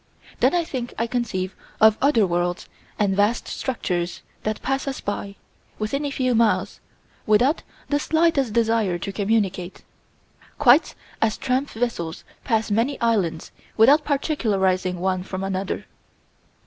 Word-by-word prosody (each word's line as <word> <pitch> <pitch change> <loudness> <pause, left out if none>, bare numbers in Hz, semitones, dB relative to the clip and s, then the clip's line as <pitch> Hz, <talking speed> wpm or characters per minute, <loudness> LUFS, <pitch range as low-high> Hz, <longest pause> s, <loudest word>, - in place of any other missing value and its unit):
Then - - +3
I 345 - +2
think 255 -6 -5
I 230 - +1
conceive 210 -6 -2 0.2
of 220 -1 +7
other 255 -7 +4
worlds 175 0 -1 0.3
and 200 -2 +1
vast 205 +4 +1
structures 175 -8 -3 0.2
that 215 0 -2
pass 270 +1 -1
us 270 - -3
by, 200 0 -4 0.4
within 275 +7 -2
a - - -1
few 255 -2 0
miles, 225 -2 +1 0.5
without 245 +9 +3 0.3
the 290 - +2
slightest 315 -6 +2
desire 225 -5 +1
to 195 +3 -5
communicate, 195 -3 -1 0.7
quite 290 +2 +5 0.3
as 220 -1 +2
tramp 265 +2 0
vessels 220 -9 -3 0.2
pass 225 -3 0
many 235 +7 +1
islands 195 -9 0 0.3
without 275 +7 +6
particularizing 195 - 0
one 185 0 0
from 185 +1 -5
another. 195 0 -3
220 Hz, 135 wpm, -23 LUFS, 190-260 Hz, 0.7 s, of